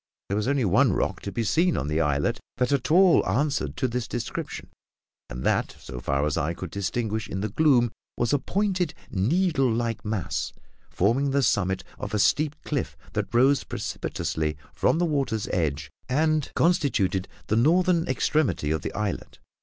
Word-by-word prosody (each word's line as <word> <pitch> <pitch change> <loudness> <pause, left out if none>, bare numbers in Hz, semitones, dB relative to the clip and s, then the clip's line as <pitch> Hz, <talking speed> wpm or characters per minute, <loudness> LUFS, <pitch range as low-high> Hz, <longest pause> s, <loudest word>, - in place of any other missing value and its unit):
There 100 - 0
was 105 +3 -1
only 140 -3 +2
one 105 +4 +4
rock - - -1
to - - -5
be 115 - -1
seen 170 - +2
on 70 - -2
the 75 +2 +1
islet 70 -2 +1 0.2
that 125 +2 +1
at 130 -3 0
all 180 +2 +6
answered 95 - 0
to - - +1
this 120 -1 -3
description, 120 -2 -5 0.6
and 60 +1 -6
that, - - +1
so 60 -1 -8
far 70 +3 0
as 75 0 -1
I 80 +2 -1
could 90 -1 -7
distinguish 110 +2 -2
in 95 - -3
the 105 - -1
gloom, 120 -2 +3 0.3
was 120 +1 +1
a 145 - +3
pointed, 185 0 -1 0.2
needle 135 - +2
like 115 -1 -1
mass, 105 -5 -2 0.4
forming 120 +9 +1
the 140 0 +2
summit 95 -5 +1 0.2
of - - -4
a - - +2
steep 145 +9 +2
cliff 125 - -3 0.2
that - - -2
rose 130 +2 +4
precipitously 75 -1 -3 0.2
from - - +2
the 175 - +2
water's 135 -9 -1
edge 75 -3 -1 0.2
and 155 +2 +1
constituted 140 - +2 0.2
the 110 - 0
northern 170 +7 +3
extremity 130 - +1
of 80 - 0
the - - -5
islet. 105 -3 -3
120 Hz, 175 wpm, -26 LUFS, 95-145 Hz, 0.6 s, all